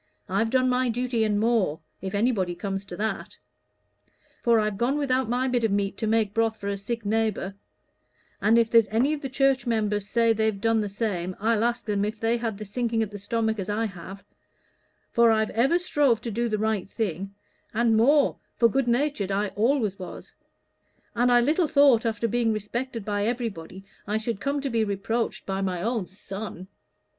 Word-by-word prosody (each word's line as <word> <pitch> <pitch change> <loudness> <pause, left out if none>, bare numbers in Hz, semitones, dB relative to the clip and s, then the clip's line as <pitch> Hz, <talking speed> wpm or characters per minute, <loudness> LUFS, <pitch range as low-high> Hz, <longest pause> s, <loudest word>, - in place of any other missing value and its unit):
I've 205 +4 0
done 255 +1 +2
my 250 0 +1
duty, 240 -1 0
and 210 -1 +1
more, 215 -9 +1 0.2
if 190 +2 -4
anybody 200 -5 +1
comes 195 +2 -4
to 180 -3 -8
that; 220 +1 -3 1.0
for 235 -2 +4
I've 210 -2 -1
gone 260 +5 +1
without 260 -4 0
my 250 +2 +1
bit 245 -2 0
of 225 - +2
meat 200 0 0
to 220 - -1
make 220 -2 +1
broth 225 0 +1
for 200 - -4
a 200 - -1
sick 230 +2 -4
neighbor: 215 -2 0 0.9
and 220 +2 +4
if 230 -1 +3
there's 230 -2 +6
any 245 +7 +1
of 300 - -4
the 270 - -4
church 270 0 +1
members 210 -3 0
say 230 0 +3
they've 220 -2 0
done 225 +1 +2
the 205 - -3
same, 190 -4 -2
I'd 220 +1 +1
ask 240 +1 0
them 205 -2 0
if 215 +1 -3
they 230 +2 +1
had 225 -3 -3
the 215 - -7
sinking 225 +2 -1
at 215 - -6
the 205 - -7
stomach 220 +1 -1
as 195 +1 -4
I 215 +2 0
have; 195 0 -8 0.9
for 235 0 +5
I've 220 -1 +2
ever 265 +10 +3
strove 290 -9 +2
to 235 - -4
do 235 +3 -1
the 215 - 0
right 215 -3 -1
thing, 195 -2 -3 0.4
and 230 0 +2
more, 275 +6 +4 0.2
for 235 - +5
good 265 +2 0
natured 240 -4 0
I 200 +1 0
always 220 -3 0
was; 185 - -9 0.8
and 245 +1 +2
I 240 0 +6
little 310 +7 +2
thought, 275 -6 +5
after 225 +1 -1
being 235 0 +1
respected 230 +2 -4
by 205 0 0
everybody, 195 -6 -4 0.2
I 210 +1 0
should 220 -1 -3
come 280 +1 -1
to 275 - -2
be 225 -1 +2
reproached 215 +3 -2
by 195 0 -2
my 185 -2 -1
own 225 -4 -1
son. 195 -1 -8
225 Hz, 195 wpm, -26 LUFS, 205-240 Hz, 1.0 s, there's